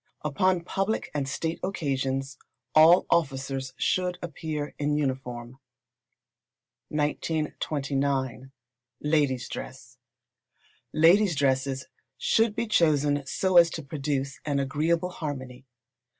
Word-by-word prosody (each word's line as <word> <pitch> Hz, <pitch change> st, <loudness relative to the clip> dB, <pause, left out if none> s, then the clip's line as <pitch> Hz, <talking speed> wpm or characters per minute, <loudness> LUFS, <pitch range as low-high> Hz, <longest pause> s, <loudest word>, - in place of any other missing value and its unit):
Upon 175 Hz, +4 st, +1 dB
public 195 Hz, +5 st, -2 dB
and 140 Hz, -2 st, -2 dB
state 165 Hz, +4 st, -3 dB
occasions 135 Hz, -7 st, -2 dB, 0.3 s
all 160 Hz, +3 st, +7 dB
officers 135 Hz, -4 st, 0 dB
should 180 Hz, -1 st, 0 dB
appear 155 Hz, -2 st, -4 dB
in 145 Hz, 0 st, +1 dB
uniform. 130 Hz, -3 st, -3 dB, 1.3 s
1929. 140 Hz, -4 st, -1 dB, 0.5 s
Ladies' 145 Hz, -4 st, +1 dB
Dress. 125 Hz, -1 st, -8 dB, 0.9 s
Ladies' 175 Hz, +3 st, +5 dB
dresses 135 Hz, -1 st, 0 dB, 0.3 s
should 225 Hz, -1 st, +2 dB
be 235 Hz, 0 st, -1 dB
chosen 150 Hz, -8 st, +2 dB
so 185 Hz, -2 st, +1 dB
as 170 Hz, -1 st, +8 dB
to 160 Hz, -, -6 dB
produce 140 Hz, -1 st, -3 dB
an 145 Hz, -2 st, -1 dB
agreeable 160 Hz, +6 st, 0 dB
harmony. 130 Hz, -6 st, -6 dB
145 Hz, 95 wpm, -27 LUFS, 135-165 Hz, 1.3 s, as